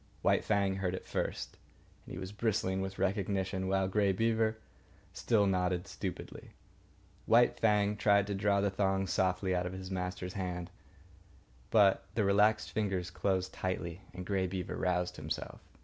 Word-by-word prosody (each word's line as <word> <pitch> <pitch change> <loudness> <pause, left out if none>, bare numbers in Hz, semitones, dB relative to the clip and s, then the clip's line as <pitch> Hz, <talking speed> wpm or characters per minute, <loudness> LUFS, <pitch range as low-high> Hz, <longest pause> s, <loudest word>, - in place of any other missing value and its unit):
White - - +3
Fang 100 -2 +1
heard 95 -1 -1
it - - -8
first, - - -3 0.5
and - - -8
he - - -5
was 95 +1 -6
bristling 105 -3 0
with 95 0 -4
recognition 95 -1 -1
while 95 0 +1
Grey 100 0 +2
Beaver 110 +2 +1 0.6
still 110 -4 +2
nodded 90 -2 0
stupidly. - - -7 0.7
White 120 +1 +5
Fang 105 -1 +3
tried 100 -1 +3
to 100 - -3
draw 100 0 +2
the 100 -1 +1
thong 95 0 +1
softly 95 0 +1
out 90 0 0
of 90 - -6
his 95 0 -7
master's 90 0 -3
hand; 90 -2 -4 1.0
but 100 -3 +4
the 110 - +2
relaxed 105 +2 +3
fingers 95 -4 -1
closed 95 -1 -1
tightly 90 -1 -3
and 90 0 -7
Grey 95 -1 0
Beaver 90 0 -4
roused 90 0 -1
himself. 75 0 -5
95 Hz, 155 wpm, -32 LUFS, 90-100 Hz, 1.0 s, White